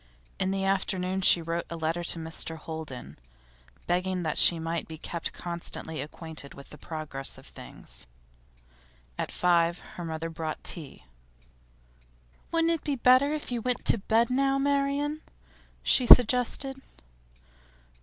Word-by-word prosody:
In 190 Hz, -, 0 dB
the 195 Hz, 0 st, -1 dB
afternoon 190 Hz, -1 st, 0 dB
she 175 Hz, -2 st, +6 dB
wrote 165 Hz, +1 st, -3 dB
a 170 Hz, -, -5 dB
letter 165 Hz, +1 st, -2 dB
to 170 Hz, -, +1 dB
Mr 160 Hz, 0 st, -4 dB
Holden, 150 Hz, -, -8 dB, 0.7 s
begging 180 Hz, +1 st, 0 dB
that 155 Hz, -2 st, -1 dB
she 170 Hz, -, +7 dB
might 165 Hz, 0 st, -3 dB
be 160 Hz, -, -8 dB
kept 170 Hz, +2 st, -4 dB
constantly 170 Hz, -3 st, -5 dB
acquainted 155 Hz, 0 st, -8 dB
with 140 Hz, -, -13 dB
the 150 Hz, -, -11 dB
progress 155 Hz, -4 st, -3 dB
of -, -, -14 dB
things. -, -, -7 dB, 1.1 s
At -, -, -2 dB
five 170 Hz, -1 st, +2 dB
her 175 Hz, -, -10 dB
mother 165 Hz, 0 st, -4 dB
brought 160 Hz, -1 st, -5 dB
tea. 155 Hz, -5 st, -3 dB, 1.5 s
'Wouldn't 330 Hz, 0 st, +2 dB
it 325 Hz, -, -4 dB
be 290 Hz, -2 st, -1 dB
better 255 Hz, +3 st, +5 dB
if 300 Hz, -4 st, -4 dB
you 240 Hz, -1 st, -1 dB
went 250 Hz, +1 st, -2 dB
to 230 Hz, -, +3 dB
bed 225 Hz, +4 st, +2 dB
now, 270 Hz, +1 st, +2 dB
Marian?' 280 Hz, +2 st, 0 dB, 0.6 s
she 250 Hz, -, +3 dB
suggested. 250 Hz, +3 st, +5 dB
175 Hz, 140 wpm, -28 LUFS, 160-250 Hz, 1.5 s, she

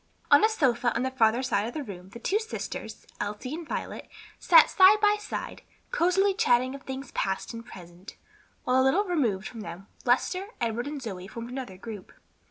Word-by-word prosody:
On -, -, +7 dB
a 435 Hz, -, +6 dB
sofa 245 Hz, -, +1 dB
on -, -, 0 dB
the 260 Hz, -, -1 dB
farther 235 Hz, 0 st, +2 dB
side 215 Hz, -4 st, 0 dB
of 240 Hz, -, -7 dB
the 305 Hz, -, -3 dB
room 190 Hz, -5 st, -9 dB
the 200 Hz, -, -10 dB
two 385 Hz, -, 0 dB
sisters, 435 Hz, -, -6 dB
Elsie 210 Hz, +6 st, -4 dB
and 330 Hz, 0 st, -6 dB
Violet, -, -, -5 dB, 0.3 s
sat 325 Hz, -3 st, +7 dB
side 390 Hz, +2 st, +6 dB
by 415 Hz, 0 st, +4 dB
side, 420 Hz, -, -6 dB, 0.3 s
cosily 390 Hz, -2 st, +3 dB
chatting 260 Hz, -, +2 dB
of 275 Hz, -, -8 dB
things 265 Hz, +1 st, -7 dB
past 195 Hz, +4 st, -2 dB
and 230 Hz, 0 st, -7 dB
present, 180 Hz, -4 st, -12 dB, 0.5 s
while 255 Hz, +1 st, +3 dB
a -, -, +4 dB
little 315 Hz, +10 st, +3 dB
removed 250 Hz, -, 0 dB
from 230 Hz, -, -8 dB
them 175 Hz, 0 st, -8 dB, 0.2 s
Lester, 365 Hz, +10 st, +1 dB
Edward 235 Hz, +2 st, -2 dB
and 290 Hz, -2 st, -5 dB
Zoe 190 Hz, -5 st, -6 dB
formed 230 Hz, +3 st, -8 dB
another 250 Hz, -8 st, -6 dB
group. 210 Hz, -1 st, -9 dB
250 Hz, 190 wpm, -27 LUFS, 215-330 Hz, 0.5 s, On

